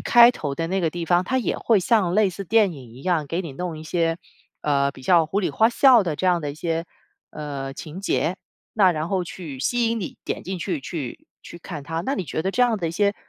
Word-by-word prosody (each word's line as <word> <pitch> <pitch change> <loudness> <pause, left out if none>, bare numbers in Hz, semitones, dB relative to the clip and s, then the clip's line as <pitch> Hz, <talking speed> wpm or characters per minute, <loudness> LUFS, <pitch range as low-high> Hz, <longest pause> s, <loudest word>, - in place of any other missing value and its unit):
开 240 0 +7
头 145 - -4
的 165 +3 -2
那 190 +3 -1
个 165 -3 +1
地 175 +1 -4
方， 175 +2 +2
它 260 +6 0
也 250 - -1
会 220 -4 +3
像 185 -2 +2
类 210 -1 +4
似 195 +2 -7
电 210 0 +3
影 130 -6 -11
一 130 - -12
样 170 -5 0
给 165 +5 -2
你 165 -6 -7
弄 170 +2 -5
一 - - -8
些， 165 0 0 0.4
呃， 140 -2 +2
比 130 - -14
较 170 +2 +4
胡里花哨 225 - +4
的 170 -5 -2
这 185 - -1
样 175 -2 +3
的 145 -2 -3
一 - - -8
些， 165 +1 -2 0.5
呃， 140 -3 -5
情 160 +3 -8
节， 180 -2 0 0.4
那 190 -4 +5
然 155 0 -3
后 185 -2 0
去 160 -6 -8
吸 240 - +1
引 230 0 -1
你 185 - -6
点 - - -3
进 190 0 -4
去 170 -3 -2
去 135 -3 -6 0.2
去 170 - -10
看 165 -4 -7
它， 160 +3 -3
那 270 +9 -1
你 190 - -3
觉 160 - -3
得 190 - 0
这 250 +5 +2
样 235 -2 +3
的 175 -5 -2
一 - - -3
些 200 +4 +1
175 Hz, 275 characters per minute, -23 LUFS, 155-200 Hz, 0.5 s, 开